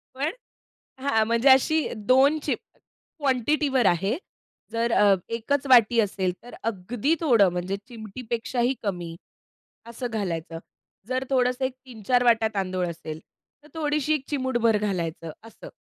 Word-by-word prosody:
पण 285 +4 -1 0.7
हां, 225 -5 +2
म्हणजे 235 +4 +3
अशी 310 +4 +4
2 265 +8 +3
चिमु 295 - -5 0.4
क्वॉन्टिटीवर 270 -1 +1
आहे. 195 - +2 0.5
जर 230 +1 0
अ, 205 -3 +5
एकच 255 +5 -1
वाटी 235 -2 +6
असेल 190 -3 -1
तर, 245 - -11
अगदी 230 - -1
थोडं 230 - +5
म्हणजे 180 +2 -3
चिमटीपेक्षाही 235 +2 -3
कमी 175 -5 -4 0.7
असं 235 +2 -6
घालायचं. 165 -6 -3 0.5
जर 255 +1 -1
थोडंसं 255 0 +1
एक 260 0 -2
3-4 245 +1 0
वाटया 225 -2 +4
तांदूळ 185 -2 -1
असेल, 160 -2 -7 0.4
तर 300 - -18
थोडीशी 300 -1 0
एक 275 -3 -3
चिमूटभर 250 -5 +1
घालायचं 170 -5 -3
असं. 225 - -12
235 Hz, 130 wpm, -25 LUFS, 200-260 Hz, 0.7 s, वाटी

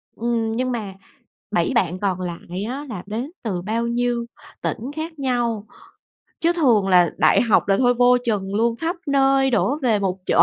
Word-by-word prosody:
Ừm, 230 -1 -1
nhưng 255 +1 -1
mà 215 -5 -4 0.6
7 - - +1
bạn 185 -5 +1
còn 185 -3 -1
lại 175 +2 -5
á 265 +6 -5
là 185 -5 -6
đến 235 +9 -4
từ 190 -6 -2
bao 225 +5 -1
nhiêu 240 0 0 0.4
tỉnh - - -2 0.2
khác 320 0 -6
nhau, 240 -5 -1 0.8
chứ 340 +1 +3
thường 235 - +3
là 180 -3 +5
đại 155 - +4
học 225 -4 +2
là 195 - +4
thôi 245 -1 +3
vô 245 +1 +5
chừng 200 -4 -1
luôn, 230 +2 +1
khắp 330 +7 -2
nơi 270 -1 +3
đổ 270 +4 +1
về 225 -5 +3
một 190 -1 -1
chỗ. - - +5
235 Hz, 185 wpm, -22 LUFS, 200-255 Hz, 0.8 s, là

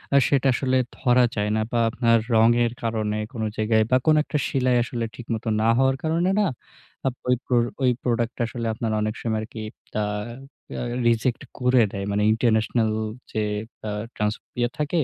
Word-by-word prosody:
আ - - +8
সেটা 140 -1 +2
আসলে 130 0 +1 0.2
ধরা 125 0 +4
যায় 105 -1 0
না 110 - +1
বা 120 - +1
আপনার 115 -1 +3 0.2
রঙের 115 +1 +4
কারণে 110 -2 -1 0.2
কোন 115 - -5 0.2
জায়গায় 110 0 +3
বা 130 - +6
কোন 155 -1 +5
একটা 150 - -2
সিলাই 130 -2 +1
আসলে 120 -1 -3
ঠিকমত 115 -1 -5 0.2
না 110 - +2
হওয়ার 135 0 +3
কারণে 165 +3 +1
না 210 - +3 0.6
আ - - +3 0.2
ওই, 125 - +4 0.5
ওই 125 - +5
product 120 -1 0
টা - - -3
আসলে 115 0 -5
আপনার 110 0 -2
অনেক 110 0 -1
সময় 110 -2 -1
আরকি 110 0 -7 0.4
আ - - +1 0.7
রা - - -3 0.2
রিজেক্ট 115 +1 +1 0.2
করে 125 -1 +4
দেয়। 100 0 -4
মানে 105 +1 +1
international 110 0 +2 0.4
যে 110 -1 -1 0.5
আ - - -2 0.2
ট্রান্সপিয়ার 110 +3 -2
থাকে 150 +3 0
120 Hz, 170 wpm, -24 LUFS, 110-125 Hz, 0.7 s, আ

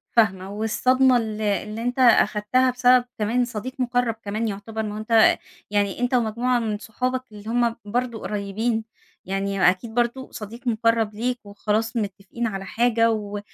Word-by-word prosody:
فاهمة، 190 -4 +2
والصدمة 250 +4 +3
ال 220 -2 -3
اللي 210 +2 -1
أنت 245 +2 -2
أخدتها 245 +1 +4
بسبب 250 0 +4
كمان 235 +4 +1
صديق 240 +2 -6
مُقرّب 245 -2 +1
كمان 215 +3 -1
يعتبر، 220 +2 -4
ما 210 -1 -4
هو - - -5
أنت 220 +1 +4 0.3
يعني 205 +1 0
أنت 245 +1 0
ومجموعة 240 +1 +1
من 215 -2 -2
صُحابك 255 +4 -2
اللي 210 +1 -9
هُم 235 -1 +1
برضو 240 +1 -2
قريبين 215 +3 -2 0.4
يعني 195 -1 +2
أكيد 205 +5 -3
برضو 240 +2 -1
صديق 230 +4 -8
مُقرّب 225 -1 +2
ليك 245 +2 -1
وخلاص 215 +3 -1
متفقين 205 +2 -3
على 195 -3 -5
حاجة 230 0 +2
و 205 -2 -3
225 Hz, 155 wpm, -23 LUFS, 210-245 Hz, 0.4 s, أخدتها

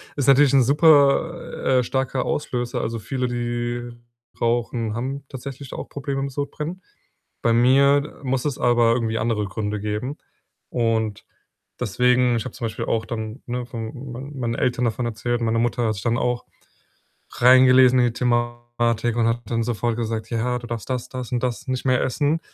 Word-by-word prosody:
Ist 140 -3 -1
natürlich 140 0 +6
'n 135 -2 +6
super, 140 -2 +3
äh, - - +1
starker 130 0 -1
Auslöser. 120 -4 -2
Also, 115 +1 -2
viele, 130 +3 -2
die 120 0 -3 0.5
rauchen, 115 -1 0
haben 135 +3 -4
tatsächlich 135 0 -8
auch - - -6
Probleme 140 -1 -3
mit 140 - -3
Sodbrennen. 150 +6 -4 0.6
Bei 115 - +2
mir 140 +4 +3
muss 130 0 -1
es 145 - -1
aber 120 -1 +3
irgendwie 115 -2 -1
andere 115 -3 0
Gründe 105 +1 -3
geben. 105 +7 -3 0.5
Und 110 -3 -1 0.5
deswegen 125 +1 +2
ich 115 - -3
habe 130 - -6
zum 125 - -4
Beispiel 110 - -3
auch 115 -1 0
dann, 110 +2 -5
ne, 125 0 -3
von 120 +3 -7
mein 135 +4 -8
meinen 115 -2 -1
Eltern 125 0 0
davon 120 +2 -1
erzählt. 120 +1 -2
Meine 115 0 +1
Mutter 120 0 0
hat 110 - 0
sich 100 - -7
dann 120 -1 +1
auch 125 0 -1 0.9
reingelesen 130 +1 +6
in 120 - +4
die 120 - 0
Thematik 120 -1 0
und 115 -1 +2
hat 115 +1 -1
dann 115 +1 -1
sofort 120 0 -1
gesagt: 115 -1 -3
„Ja, 125 +1 0
du 120 - -9
darfst 115 +1 -5
das, 125 -1 -2
das 125 -2 -6
und 120 -1 0
das 125 +2 -3
nicht 130 -1 -2
mehr 130 -1 +3
essen.“ 145 +5 0
120 Hz, 175 wpm, -23 LUFS, 115-130 Hz, 0.9 s, natürlich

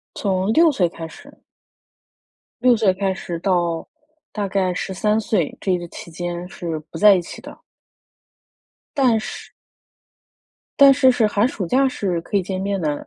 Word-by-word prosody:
从 190 +1 0
6 325 +1 +5
岁 180 -9 +1
开 165 -1 -8
始。 - - -15 1.2
6 245 -2 +5
岁 210 -4 +3
开 190 0 -1
始 175 -2 -6
到 175 -3 -1 0.4
大 205 -2 -2
概 185 -2 0
13 210 +4 -1
岁， 205 -7 -1
这 190 - 0
一 180 - +1
个 175 0 -8
期 170 - -10
间 175 +1 -5
是 170 -3 -5
不 - - -7
在 205 -1 +7
一 180 - 0
起 - - -10
的。 - - -12 1.4
但 250 -5 +3
是 - - -8 1.3
但 275 -1 +8
是 260 -1 +5
是 230 -3 +2
寒 210 +2 +2
暑 205 -9 -4
假 265 +8 +3
是 185 -8 -2
可 200 - -3
以 195 - +2
见 185 +1 -4
面 200 -1 -2
的， 150 -2 -3
190 Hz, 165 characters per minute, -21 LUFS, 175-220 Hz, 1.4 s, 但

